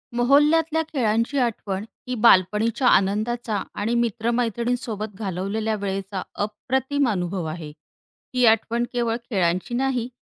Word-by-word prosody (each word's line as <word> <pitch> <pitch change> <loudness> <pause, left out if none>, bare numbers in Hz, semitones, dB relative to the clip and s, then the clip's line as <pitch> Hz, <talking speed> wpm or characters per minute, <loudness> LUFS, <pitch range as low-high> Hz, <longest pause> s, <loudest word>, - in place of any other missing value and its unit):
मोहल्ल्यात 290 +6 +4
ल्या 320 - +3
खेळांची 230 +1 +1
आठवण 210 -5 -2 0.2
ही 250 - -2
बालपणीच्या 215 +5 +4
आनंदाचा 215 +2 +1 0.2
आणि 220 +3 0
मित्रमैत्रिणींसोबत 235 -1 -1
घालवलेल्या 205 +2 -2
वेळेचा 195 0 -3 0.2
अप्रतिम 265 +6 -1
अनुभव 180 -3 -2
आहे. 155 -1 -7 0.6
ही 250 -1 +4
आठवण 225 +2 +2
केवळ 235 -2 0
खेळांची 185 +1 0
नाही 255 -2 0
225 Hz, 110 wpm, -23 LUFS, 200-245 Hz, 0.6 s, मोहल्ल्यात